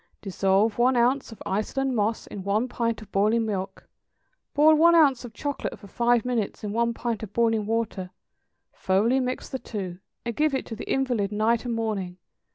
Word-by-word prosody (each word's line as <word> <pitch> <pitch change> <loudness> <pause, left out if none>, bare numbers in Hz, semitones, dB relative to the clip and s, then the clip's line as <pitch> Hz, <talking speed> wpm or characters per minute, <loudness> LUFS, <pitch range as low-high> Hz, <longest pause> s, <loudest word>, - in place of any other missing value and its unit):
= - - -41
Dissolve 195 +3 +1
one 250 +2 +4
ounce 250 +2 +2
of 225 - -10
Iceland 255 +7 -1
moss 220 +1 0
in 195 - -8
one 210 +5 +1
pint 230 -3 -2
of 205 - -18
boiling 215 +3 +2
milk; 195 -2 -4 0.7
boil 305 +2 +6
one 335 +2 +6
ounce 280 -7 +4
of 245 - -8
chocolate 285 +6 -4
for - - -14
five 235 +3 +1
minutes 235 -5 -2
in 205 -1 -3
one 235 +1 +1
pint 235 -3 -3
of 210 -2 -8
boiling 225 -3 +1
water; 220 -5 -2 0.6
thoroughly 215 +8 +2
mix 255 0 -3
the 265 - -5
two; 185 -7 -6 0.3
and 235 -1 -3
give 305 -2 +2
it - - -2
to 225 - -6
the 220 - -6
invalid 245 -7 0
night 220 +3 +1
and 235 -1 -1
morning. 200 -6 -3
225 Hz, 190 wpm, -26 LUFS, 205-250 Hz, 0.7 s, boil